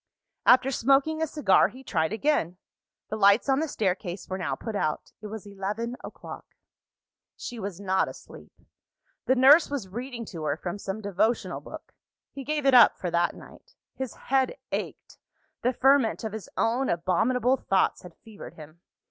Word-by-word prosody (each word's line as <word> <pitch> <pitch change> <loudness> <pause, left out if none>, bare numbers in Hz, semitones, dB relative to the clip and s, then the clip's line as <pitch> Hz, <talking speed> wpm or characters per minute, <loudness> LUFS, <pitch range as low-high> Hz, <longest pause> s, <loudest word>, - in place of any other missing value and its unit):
After 260 +1 +6
smoking 275 +5 +2
a 320 - +1
cigar, 280 -11 +3
he 255 +7 -13
tried 160 -8 -1
again. 220 - 0 0.5
The - - -1
lights 200 +3 +4
on 270 0 +3
the 320 - -1
staircase 190 - -3
were 190 0 -4
now 175 - -2
put 225 -2 -6
out: 155 -6 -2
it 215 - -7
was 215 -1 -8
eleven 205 +4 -4
o'clock. - - -10 0.8
She 240 -2 -7
was 195 -3 -5
not 190 -1 +1
asleep: - - -12 0.8
the 260 - +4
nurse 275 +6 +6
was 275 -9 -4
reading 240 +3 -6
to 165 - -6
her 145 0 -1
from 175 +4 -5
some 195 +2 -5
devotional 210 +3 -1
book. - - -11 0.4
He 275 - -8
gave 295 0 -2
it 270 - +4
up, 240 -4 +7
for 180 - -4
that 170 0 +1
night. - - -16 0.2
His 260 -3 -6
head 265 - 0
ached; - - -5 0.4
the 250 - +2
ferment 265 -3 +3
of 220 -2 -4
his 220 -2 -7
own 245 +4 +1
abominable 235 +9 +1
thoughts 195 -6 +1
had 180 -2 -13
fevered 220 -2 -11
him. 155 +2 -13
220 Hz, 170 wpm, -26 LUFS, 190-265 Hz, 0.8 s, up